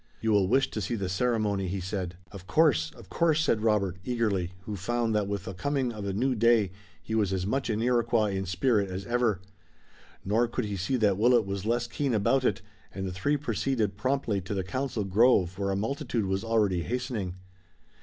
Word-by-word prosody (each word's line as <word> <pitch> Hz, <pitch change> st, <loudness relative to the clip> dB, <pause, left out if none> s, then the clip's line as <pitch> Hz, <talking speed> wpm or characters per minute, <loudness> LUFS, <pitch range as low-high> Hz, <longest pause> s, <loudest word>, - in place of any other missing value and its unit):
"You 110 Hz, -, 0 dB
will 100 Hz, -3 st, +4 dB
wish 135 Hz, +6 st, +2 dB
to 110 Hz, -, -3 dB
see 120 Hz, -, -2 dB
the 100 Hz, -4 st, -2 dB
ceremony," 105 Hz, -2 st, 0 dB
he 95 Hz, +2 st, -2 dB
said. 90 Hz, -1 st, -4 dB, 0.2 s
"Of 95 Hz, -2 st, -11 dB
course, 125 Hz, -, +3 dB
of 115 Hz, -5 st, -13 dB
course!" 165 Hz, -2 st, +2 dB
said 110 Hz, -8 st, +1 dB
Robert, 105 Hz, -5 st, +1 dB
eagerly, 105 Hz, -7 st, 0 dB
who 105 Hz, +1 st, -5 dB
found 115 Hz, +4 st, -1 dB
that 105 Hz, -2 st, +1 dB
with 100 Hz, -2 st, -3 dB
the 95 Hz, -, -5 dB
coming 130 Hz, +5 st, -1 dB
of 105 Hz, -2 st, -6 dB
a 100 Hz, -, -1 dB
new 125 Hz, +7 st, +1 dB
day 115 Hz, -4 st, +3 dB, 0.3 s
he 110 Hz, -, -5 dB
was 105 Hz, -4 st, +1 dB
as 95 Hz, -1 st, -1 dB
much 135 Hz, +7 st, -1 dB
an 110 Hz, 0 st, 0 dB
Iroquois 115 Hz, -3 st, +2 dB
in 95 Hz, -1 st, -3 dB
spirit 100 Hz, +3 st, +1 dB
as 95 Hz, +1 st, -5 dB
ever. 120 Hz, -6 st, +1 dB, 0.8 s
Nor 110 Hz, +5 st, +2 dB
could 115 Hz, -, -2 dB
he 105 Hz, -1 st, -3 dB
see 95 Hz, +7 st, -1 dB
that 105 Hz, -5 st, +2 dB
Willet 120 Hz, -1 st, +4 dB
was 100 Hz, +1 st, -4 dB
less 120 Hz, +1 st, +1 dB
keen 120 Hz, +3 st, -1 dB
about 130 Hz, +6 st, +2 dB
it 100 Hz, -6 st, 0 dB, 0.3 s
and 95 Hz, 0 st, -5 dB
the 90 Hz, -, -4 dB
three 145 Hz, +11 st, 0 dB
proceeded 120 Hz, -5 st, -1 dB
promptly 115 Hz, -3 st, 0 dB
to 100 Hz, +3 st, -5 dB
the 95 Hz, -, -1 dB
council 125 Hz, +3 st, -2 dB
grove 95 Hz, -2 st, +3 dB
where 100 Hz, -1 st, 0 dB
a 95 Hz, -, 0 dB
multitude 115 Hz, +1 st, -2 dB
was 95 Hz, +1 st, -1 dB
already 105 Hz, -6 st, +1 dB
hastening. 115 Hz, -, -3 dB
105 Hz, 205 wpm, -28 LUFS, 95-120 Hz, 0.8 s, will